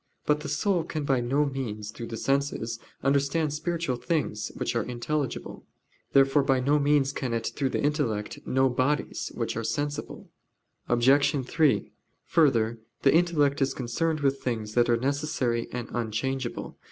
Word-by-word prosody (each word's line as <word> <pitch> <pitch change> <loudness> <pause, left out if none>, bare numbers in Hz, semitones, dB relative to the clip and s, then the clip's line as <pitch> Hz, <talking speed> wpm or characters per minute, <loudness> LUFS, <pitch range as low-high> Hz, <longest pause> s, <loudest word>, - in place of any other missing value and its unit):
But 150 0 +2
the 150 -1 -6
soul 175 +4 +1
can 155 -3 -4
by 135 -2 +2
no 135 +5 +2
means, 110 -7 -4
through 115 +1 -7
the 115 - -5
senses, 135 -5 -1 0.2
understand 140 +2 +1
spiritual 165 -4 -2
things, 120 -4 -2
which - - -2
are 115 - +2
intelligible. 125 +4 -3 0.5
Therefore 135 +1 +5
by 135 -1 +2
no 145 +4 +3
means 145 -1 +2
can 125 -4 -2
it, 115 - -2
through 135 -2 0
the - - -2
intellect, 130 -8 -1
know 130 +1 +3
bodies, 130 +3 -1
which - - -2
are 115 - -2
sensible. 145 +6 -4 0.6
Obj. 135 +3 +3
3: 155 +1 +2 0.3
Further, 115 -8 +3 0.2
the 135 - +5
intellect 155 -5 +3
is 135 - +1
concerned 150 +6 -1
with 135 -1 +1
things 110 -4 -3
that 120 0 +3
are 120 - +4
necessary 135 -3 -1
and 120 -1 -4
unchangeable. 120 +3 -3
135 Hz, 155 wpm, -27 LUFS, 120-145 Hz, 0.6 s, Therefore